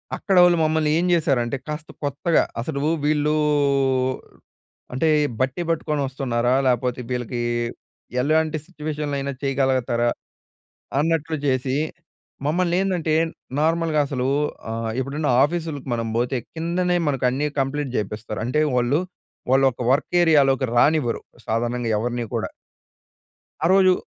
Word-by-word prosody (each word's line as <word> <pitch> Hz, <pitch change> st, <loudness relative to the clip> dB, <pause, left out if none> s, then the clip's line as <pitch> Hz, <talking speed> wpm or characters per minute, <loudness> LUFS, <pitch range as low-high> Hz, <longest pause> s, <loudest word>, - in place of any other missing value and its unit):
అక్కడోళ్ళు 180 Hz, -3 st, +4 dB
మమ్మల్ని 155 Hz, -1 st, +2 dB
ఏం 175 Hz, -, +1 dB
చేశారంటే 140 Hz, -7 st, +1 dB
కాస్త 150 Hz, +1 st, -5 dB
కొత్తగా, 145 Hz, +4 st, +2 dB, 0.2 s
అసలు 140 Hz, +3 st, -3 dB, 0.2 s
వీళ్ళూ 150 Hz, 0 st, +2 dB, 1.6 s
అంటే 145 Hz, +6 st, +1 dB, 0.3 s
బట్టి 130 Hz, +5 st, 0 dB
పట్టుకొని 155 Hz, -2 st, 0 dB
వస్తున్నారా? 125 Hz, -2 st, 0 dB
లేపోతే 125 Hz, 0 st, 0 dB
వీళ్ళకి 125 Hz, -1 st, -3 dB, 0.8 s
ఎలాంటి 155 Hz, +3 st, +1 dB
సిట్యుయేషన్‌లో 150 Hz, -4 st, -4 dB
అయినా 140 Hz, 0 st, -3 dB
చేయగలగతారా? 130 Hz, -3 st, +1 dB, 0.9 s
అన్నట్లు 160 Hz, 0 st, 0 dB
జేసి, 130 Hz, 0 st, +1 dB, 0.7 s
మమ్మల్నేందంటే 175 Hz, 0 st, +1 dB, 0.5 s
నార్మల్‌గా 160 Hz, -1 st, +2 dB
అసలు 130 Hz, -2 st, -2 dB, 0.4 s
ఆహ్, 115 Hz, 0 st, -2 dB
ఇప్పుడున్న 145 Hz, +3 st, -2 dB
ఆఫీస్‌లకి 155 Hz, -3 st, -2 dB
మనం 115 Hz, -1 st, -2 dB
బోతే 125 Hz, +2 st, 0 dB
కిందనే 175 Hz, +2 st, 0 dB
మనకు 135 Hz, -3 st, +1 dB
అన్నీ 145 Hz, +4 st, -1 dB
కంప్లీట్ 135 Hz, 0 st, -2 dB
చేపిస్తారు. 105 Hz, 0 st, -4 dB
అంటే 130 Hz, +6 st, +1 dB
వాళ్ళు, 125 Hz, +6 st, +2 dB, 0.5 s
వాళ్ళొక 130 Hz, -2 st, +3 dB
వర్క్ 140 Hz, +3 st, +1 dB
ఏరియాలోకి 135 Hz, -5 st, +4 dB
రానివ్వరు. 145 Hz, -3 st, +3 dB, 0.3 s
సాధారణంగా 120 Hz, +1 st, -1 dB
ఎవరిని 120 Hz, +1 st, -2 dB
కూడా. -, -, -2 dB, 1.1 s
ఆ -, -, +3 dB
రోజు, 190 Hz, -1 st, +6 dB
140 Hz, 110 wpm, -23 LUFS, 125-160 Hz, 1.6 s, రోజు